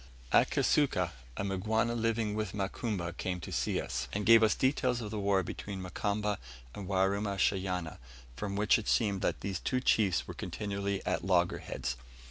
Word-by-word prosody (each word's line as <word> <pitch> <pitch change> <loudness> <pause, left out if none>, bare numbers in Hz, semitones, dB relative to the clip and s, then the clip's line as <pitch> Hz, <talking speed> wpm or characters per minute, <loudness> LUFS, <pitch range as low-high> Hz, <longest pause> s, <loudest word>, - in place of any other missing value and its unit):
At - - +5
Kisuka 90 - +2 0.3
a - - -1
Mgwana 110 +5 0
living 115 -2 0
with 110 0 -2
Mukamba 95 -3 -2
came 90 0 -3
to - - -7
see - - 0
us, - - -3
and 100 0 -2
gave 115 0 +8
us 110 -1 +4
details 130 -2 +1
of 105 -3 -5
the 110 - -3
war 100 -1 +2
between 100 +3 -6
Mukamba 100 +3 -1 0.3
and 100 -3 -7
Warumashanya, 95 -3 0 0.4
from 100 +9 -4
which 105 +2 +4
it 110 - -7
seemed 100 -5 +2
that - - -1
these 95 -3 -3
two 130 - 0
chiefs 105 -7 +2
were - - -6
continually 100 -1 -3
at - - 0
loggerheads. 90 -8 0
100 Hz, 165 wpm, -31 LUFS, 95-110 Hz, 0.4 s, gave